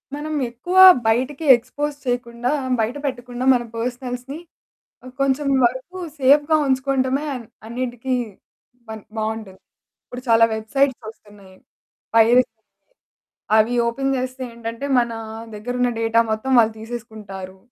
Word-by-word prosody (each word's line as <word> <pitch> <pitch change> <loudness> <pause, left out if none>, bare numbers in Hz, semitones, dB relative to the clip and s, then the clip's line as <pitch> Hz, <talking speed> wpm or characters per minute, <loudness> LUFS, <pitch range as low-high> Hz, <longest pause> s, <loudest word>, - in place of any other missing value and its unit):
మనం 305 +1 -5 0.2
ఎక్కువ 300 +11 -4 0.3
బయటికి 260 +7 0
ఎక్స్‌పోజ్ 290 +5 -4
చేయకుండా 245 0 -2 0.3
బయట 225 +4 -1
పెట్టకుండా 245 -1 -4
మన 245 - 0
పర్సనల్స్‌ని 250 +4 -5 0.8
కొంచెం 275 +1 +1 0.2
వరకు 260 +9 -3 0.2
సేఫ్‌గా 290 +4 +4
ఉంచుకోవడమే 265 +1 0 0.4
అన్నిటికి 245 +1 -3 0.8
బన్ 220 -2 -7
బావుంటుంది. 215 -3 -4 0.4
ఇప్పుడు 250 0 -9
చాలా 230 0 +6
వెబ్‌సైట్స్ 260 +4 0
వస్తున్నాయి. 205 -3 -17 0.6
ప్రైరసి... 235 +3 +5 1.1
అవి 220 +2 +3
ఓపెన్ 270 +3 -1
జేస్తే 255 0 -4
ఏంటంటే, 230 +3 -6
మన 235 -1 +2 0.4
దగ్గరున్న 245 +4 -1
డేటా 225 0 +2
మొత్తం 220 +5 -2
వాళ్ళు 220 -1 +3
తీసేసుకుంటారు. 215 -5 -8
245 Hz, 105 wpm, -21 LUFS, 225-265 Hz, 1.1 s, చాలా